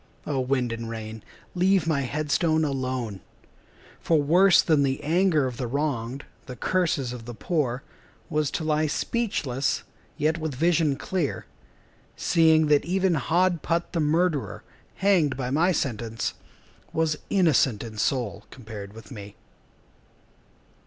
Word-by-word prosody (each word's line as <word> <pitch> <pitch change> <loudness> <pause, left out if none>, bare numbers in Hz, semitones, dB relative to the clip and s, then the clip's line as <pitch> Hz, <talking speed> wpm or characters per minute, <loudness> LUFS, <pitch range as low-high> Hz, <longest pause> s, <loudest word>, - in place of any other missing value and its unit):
O 140 -3 -1
wind 130 -2 0
and 115 0 -5
rain, 110 -1 -7 0.3
leave 185 0 +3
my 155 -4 +1
head 145 +3 -3
stone 160 -2 +2
alone 130 -7 -3 0.8
For 165 -2 +2
worse 180 +6 +5
than 155 -4 +3
the 135 0 0
anger 165 -1 +2
of 125 -2 -4
the 125 - -3
wronged, 135 -1 -2 0.2
The 125 - -7
curses 145 -4 0
of 120 -2 -8
the 120 -1 -7
poor, 135 -4 -1 0.4
Was 150 -2 0
to 160 - -3
lie 155 0 +1
speechless, 150 - -1 0.3
yet 160 +2 +1
with 155 -4 -3
vision 160 -1 +2
clear, 170 -1 -2 0.7
Seeing 160 -2 +4
that 150 -1 +3
even 185 +2 +1
Hod 170 +3 +1
Putt, 170 +1 -1
the 170 - 0
murderer, 160 -1 0 0.3
Hanged 180 -9 +2
by 125 -2 -3
my 165 +6 +3
sentence, 115 - -2 0.6
Was 160 -2 0
innocent 145 - +3
in 110 -2 -8
soul 105 -5 -1
compared 105 -5 -9
with 115 +4 -13
me. 100 -4 -9
145 Hz, 140 wpm, -25 LUFS, 125-165 Hz, 0.8 s, worse